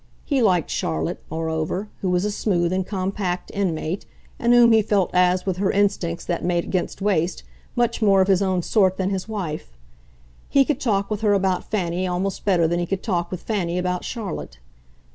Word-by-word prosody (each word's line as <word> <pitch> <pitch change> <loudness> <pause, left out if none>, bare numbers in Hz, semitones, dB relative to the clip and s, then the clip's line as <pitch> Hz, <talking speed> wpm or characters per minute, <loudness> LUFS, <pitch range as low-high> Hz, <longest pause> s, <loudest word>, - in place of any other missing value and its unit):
He 275 -3 +1
liked 180 -7 +2
Charlotte, 80 0 -2
moreover, 160 +5 -2
who 190 - 0
was 180 +2 +1
a 210 - 0
smooth 175 -4 0
and 190 0 +1
compact 185 -2 -2
inmate, 180 -2 -2 0.3
and 235 - +2
whom 240 -1 +7
he 220 -1 +6
felt 200 -3 +1
as, 180 0 +3
with 190 -2 -1
her 195 0 +1
instincts 195 -4 0
that 175 - -2
made 175 -1 +1
against 185 +1 -3
waste, 180 -4 0 0.3
much 240 -1 +1
more 200 -3 +5
of 190 - +4
his 195 -1 +3
own 185 -2 +1
sort 190 -2 +2
than 190 0 0
his 190 0 -3
wife. 155 - -5 0.7
He 275 -1 +4
could 290 -2 -1
talk 205 -6 0
with 210 0 -2
her 210 -2 +3
about 190 -2 0
Fanny 185 -3 -1
almost 185 +2 -2
better 175 -5 +3
than 170 +1 0
he 175 - -2
could 195 +1 -2
talk 175 -5 -1
with 185 - -6
Fanny 180 -6 -1
about 180 0 -1
Charlotte. 220 - -5
185 Hz, 195 wpm, -23 LUFS, 175-205 Hz, 0.7 s, whom